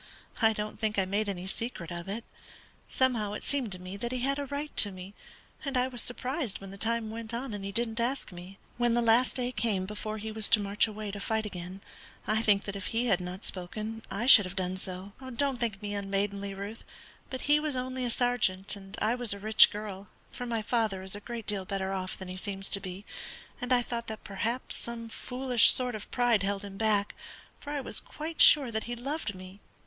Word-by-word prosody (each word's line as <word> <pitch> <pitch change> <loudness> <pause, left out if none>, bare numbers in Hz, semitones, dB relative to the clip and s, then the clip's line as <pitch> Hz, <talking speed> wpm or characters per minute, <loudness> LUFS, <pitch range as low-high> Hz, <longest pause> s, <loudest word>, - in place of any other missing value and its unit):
I 225 -1 +6
don't 210 0 -5
think 215 -2 -1
I 190 - +3
made 205 +2 0
any 185 -2 -4
secret 190 -3 -4
of 170 +2 -6
it. 220 +4 -3 0.7
Somehow 235 -6 +1
it 210 - -5
seemed 265 -7 -1
to 180 - -7
me 185 +2 -7
that 235 +4 -3
he 255 -1 -2
had 275 +2 +1
a 285 - -3
right 285 +2 -4
to 205 - +6
me, 185 +1 -9 0.5
and 275 -3 -1
I 250 +1 +3
was 245 -3 0
surprised 250 - -2
when 195 -1 -9
the 195 - -9
time 230 0 -1
went 230 0 -5
on 245 -1 -4
and 205 -1 -5
he 200 - -4
didn't 230 +1 -1
ask 245 0 -1
me. 180 +2 -10 0.2
When 240 -1 +2
the 240 - +2
last 230 +3 +4
day 250 -1 -1
came 215 -5 0
before 210 +2 -5
he 220 +1 -5
was 215 -1 +3
to 225 - +7
march 205 +2 +2
away 215 -1 -5
to 205 - -6
fight 220 +2 -1
again, 185 -1 -7 0.4
I 215 +1 +1
think 205 -3 +3
that 200 - -5
if 195 -2 -4
he 235 +1 0
had 195 -6 +2
not 180 +2 -6
spoken 215 +5 -4
I 200 +5 -2
should 220 -6 +10
have 185 +1 -6
done 185 -1 -1
so. 185 +1 -1
Do 260 - -7 0.2
not 270 -3 -2
think 215 -4 -2
me 205 0 -3
unmaidenly, 200 0 -2
Ruth, 200 +3 -7 0.5
but 260 - -5
he 295 +1 +4
was 300 -2 -1
only 255 0 -2
a 245 - 0
sergeant 220 -6 +1
and 195 -1 -10
I 220 +2 +3
was 245 -4 0
a - - -8
rich 215 +2 +8
girl, 205 -2 -6 0.2
for 245 - -6
my 230 -2 -1
father 215 -4 0
is 190 +1 -2
a - - -6
great 230 +1 -6
deal 205 -2 0
better 195 0 -2
off 185 -1 -3
than 190 - -8
he 185 0 -6
seems 195 0 -5
to 200 - +1
be, 190 +1 -7 0.6
and 250 +1 -3
I 245 -1 +5
thought 235 -1 -4
that 220 -1 -6
perhaps 225 +6 -2
some 230 -1 -6
foolish 250 0 +4
sort 250 -1 +1
of 215 -1 -7
pride 245 -3 +3
held 200 0 -1
him 200 -1 -8
back, 210 -2 +2 0.5
for 290 - -9
I 290 -1 -2
was - - +1
quite 315 +1 -4
sure 275 -5 +8
that 220 0 -2
he 240 - -4
loved 260 -3 -3
me. 185 +2 -11
215 Hz, 235 wpm, -30 LUFS, 195-240 Hz, 0.7 s, should